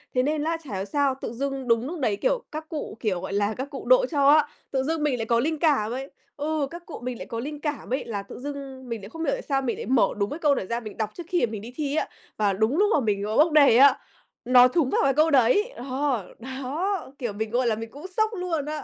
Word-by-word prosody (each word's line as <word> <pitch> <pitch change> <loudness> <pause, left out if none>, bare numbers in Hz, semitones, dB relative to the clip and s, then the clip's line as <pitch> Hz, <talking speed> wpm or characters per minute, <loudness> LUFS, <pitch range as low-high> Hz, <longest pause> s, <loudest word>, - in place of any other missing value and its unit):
Thế 255 - +3
nên 300 +1 0
á, 330 +1 0
chả 245 -9 -6
hiểu 190 +1 -2
sao 275 +4 +1
tự 230 - -4
dưng 270 0 -3
đúng 230 +2 +2
núc 340 0 -5
đấy, 215 -6 +1
kiểu, - - +1
các 310 +1 -6
cụ, 305 -7 -5
kiểu, 190 -5 -1
gọi - - -5
là, 205 +1 +1
các 265 +3 -4
cụ 275 - -7
độ - - +5
cho 280 -2 +4
á, 300 0 +6 0.2
tự 265 -1 0
dưng 315 +1 -1
mình 275 -4 +1
lại 225 - -2
có 235 0 +2
linh 310 +3 -1
cảm 275 -9 +2
ấy. 265 +3 -5 0.3
Ừ, 300 -1 -1
các 345 0 -9
cụ 330 - -8
mình 250 -2 -3
lại 185 - -7
có 230 +3 -5
linh 295 +4 -5
cảm 295 -4 -4
ấy, 265 - -1
là 205 -4 -4
tự 200 - -10
dưng 270 -2 -7
mình 230 -3 -4
lại 200 - -9
không 325 +6 -6
hiểu - - +1
tại - - -3
sao 275 - 0
mình 245 -3 -2
lại - - -5
mở 250 +1 +4
đúng 200 0 0
cái 300 - -5
câu 295 -3 +3
đó - - -2
ra 235 0 -1
mình 215 -3 -9
đọc 220 -2 -1
trước 345 - -8
khi 355 -6 +2
mà 225 - -8
mình 215 - -5
đi 235 +4 -10
thi 295 -2 -2
á, - - 0 0.3
và 205 -2 +2
đúng 220 - +1
lúc 410 +2 +4
mà - - +4
mình, 205 -4 0
ờ, 215 +2 -2
bốc 315 +2 +5
đề 285 -6 +6
á, 275 +1 +7 0.5
nó 250 0 +7
thúng 270 0 +1
vào - - +2
cái 275 -1 +3
câu 310 +1 +3
đấy. 275 - +4
Ờ, 260 -4 -2
đó, 275 - -3
kiểu, 240 -5 -3
mình, 220 +2 -3
gọi 245 +2 +1
là, 225 - +2
mình 225 +1 -6
cũng 290 +5 -11
sốc 435 +4 +1
luôn 355 -7 -2
á. 305 0 -4
270 Hz, 290 wpm, -25 LUFS, 230-305 Hz, 0.5 s, á